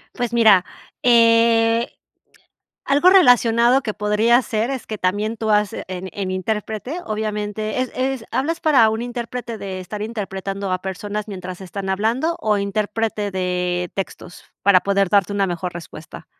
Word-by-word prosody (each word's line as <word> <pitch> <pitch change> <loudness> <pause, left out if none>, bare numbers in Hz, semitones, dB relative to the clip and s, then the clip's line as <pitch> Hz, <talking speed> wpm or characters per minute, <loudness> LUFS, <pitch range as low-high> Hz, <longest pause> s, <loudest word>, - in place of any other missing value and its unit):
Pues 245 -2 -3
mira, 215 -6 +5 0.4
eh, 230 -1 +4 1.0
algo 290 +6 +4
relacionado 245 - +5
que 215 - -3
podría 215 +4 +2
ser 220 0 -2
es 265 -4 -5
que 215 - -5
también 205 +4 -1
tú 220 0 -3
has 210 -1 +2
en 185 0 -6
en 190 -2 -3
intérprete 215 - -3
obviamente 215 0 -3
es 255 - -3
es, 260 -2 -2
¿hablas 320 +5 -1
para 270 -9 +5
un 220 +1 -2
intérprete 240 -1 -5
de 190 -2 -6
estar 205 +3 -7
interpretando 195 -3 -4
a 185 0 -1
personas 205 +2 -5
mientras 185 -1 -7
están 190 +1 -6
hablando 230 - 0
o 210 -1 +1
interprete 210 +1 -2
de 180 -1 -2
textos? 185 -2 -6 0.2
Para 190 -2 +5
poder 200 0 +1
darte 200 -1 +2
una 200 -1 +1
mejor 175 0 -4
respuesta. 160 -2 -10
210 Hz, 150 wpm, -20 LUFS, 195-235 Hz, 1.0 s, mira